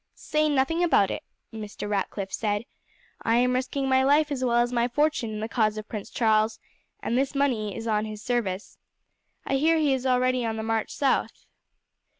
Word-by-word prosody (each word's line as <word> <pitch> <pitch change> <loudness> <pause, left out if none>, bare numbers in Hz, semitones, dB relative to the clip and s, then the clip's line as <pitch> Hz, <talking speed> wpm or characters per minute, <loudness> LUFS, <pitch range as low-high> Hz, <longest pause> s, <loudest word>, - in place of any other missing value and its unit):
"Say 305 0 0
nothing 290 +5 +1
about 205 - +3
it," - - -4 0.3
Mr. 210 -1 -6
Ratcliff 200 -1 -2
said. 210 0 -1 0.6
"I 225 - +2
am 250 +1 +3
risking 260 +2 -1
my 260 0 +4
life 290 +2 +3
as 260 -2 -2
well 240 -2 +2
as 240 +1 +2
my 240 0 +2
fortune 290 -2 0
in 215 -1 -5
the 220 - -2
cause 215 -2 +1
of 215 0 -6
Prince 210 -3 -6
Charles, 220 -1 +2 0.4
and 235 - -1
this 270 +2 0
money 235 -8 0
is 225 - -6
on 215 -1 +1
his 215 -1 -7
service. 215 -6 -2 0.7
I 270 - +1
hear 320 +4 +3
he 300 -3 +2
is 260 0 -1
already 255 0 +2
on 225 -1 -2
the 220 - -3
march 225 -1 -1
south. 275 -2 0
240 Hz, 190 wpm, -26 LUFS, 215-270 Hz, 0.7 s, my